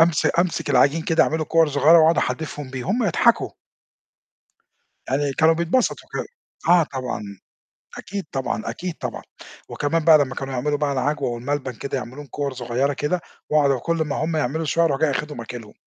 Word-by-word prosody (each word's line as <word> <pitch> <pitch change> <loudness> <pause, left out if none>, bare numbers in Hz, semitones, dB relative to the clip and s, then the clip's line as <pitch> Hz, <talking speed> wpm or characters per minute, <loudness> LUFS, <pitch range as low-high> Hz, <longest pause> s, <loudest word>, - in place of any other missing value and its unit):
أمس 165 -1 +4
أمسك 175 -1 0
العجين 155 +3 +4
كده 165 - +3
اعمله 160 0 -1
كُوَر 165 0 +3
صغيرة، 150 +4 +5
واقعد 160 +1 +5
أحدّفهم 145 -4 -3
بيه 130 -2 -5
هم 235 +3 +1
يضحكوا. 170 - +2 1.6
يعني 140 +1 0
كانوا 160 +3 +4
بيتبسطوا 170 +10 0
كده، - - -2 0.4
آه، 175 0 +6
طبعًا، 130 -7 -4 0.8
أكيد 200 -1 -5
طبعًا، 135 -5 -2
أكيد 170 +10 -4
طبعًا، - - -6 0.5
وكمان 155 +2 -1
بقى 160 -2 +8
لما 135 -3 -1
كانوا 135 -1 -5
يعملوا 145 +4 0
بقى 145 -1 0
العجوة 140 +1 -1
والملبن 130 +2 -3
كده 135 +5 -4
يعملوهم 130 +3 -8
كُوَر 140 +2 -3
صغيرة 125 +3 -1
كده، 150 +6 -1 0.3
واقعد 140 -3 +3
كل 170 +6 -1
ما 150 - -3
هم 160 0 -2
يعملوا 155 +2 -1
شوية 165 +3 +2
أروح 140 -3 0
جاي 155 -2 +3
أخدهم 150 -3 -4
آكلهم. 115 -2 -9
145 Hz, 170 wpm, -22 LUFS, 135-160 Hz, 1.6 s, بقى